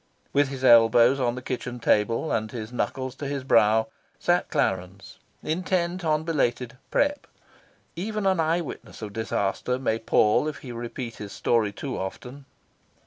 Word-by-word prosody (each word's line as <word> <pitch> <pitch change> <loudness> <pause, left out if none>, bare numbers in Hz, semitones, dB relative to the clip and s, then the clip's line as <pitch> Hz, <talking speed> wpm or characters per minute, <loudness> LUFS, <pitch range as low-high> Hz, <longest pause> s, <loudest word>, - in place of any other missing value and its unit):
With 145 0 +3
his 135 -1 -7
elbows 120 +2 +6
on 120 -2 0
the 125 - -7
kitchen 125 -1 -4
table, 115 +6 +1
and 110 -1 -1
his 115 0 -6
knuckles 130 +1 -2
to 145 - -4
his 140 -1 -3
brow, 110 -3 +4 0.3
sat - - +1
Clarence, 90 +2 -2 0.2
intent 180 +2 -1
on 155 -1 +1
belated 125 -7 -1
"prep." 290 +1 0 0.7
Even 210 +3 -3
an 190 -2 +2
eye 165 +2 +2
witness 140 -6 -9
of 105 -1 -6
disaster 110 +2 -1
may 115 -4 -1
pall 110 +4 +3
if 155 - -4
he 125 - -6
repeat 120 0 -6
his 105 -1 -8
story 115 -3 +1
too 130 +6 -5
often. 125 +8 -7
125 Hz, 155 wpm, -25 LUFS, 115-155 Hz, 0.7 s, elbows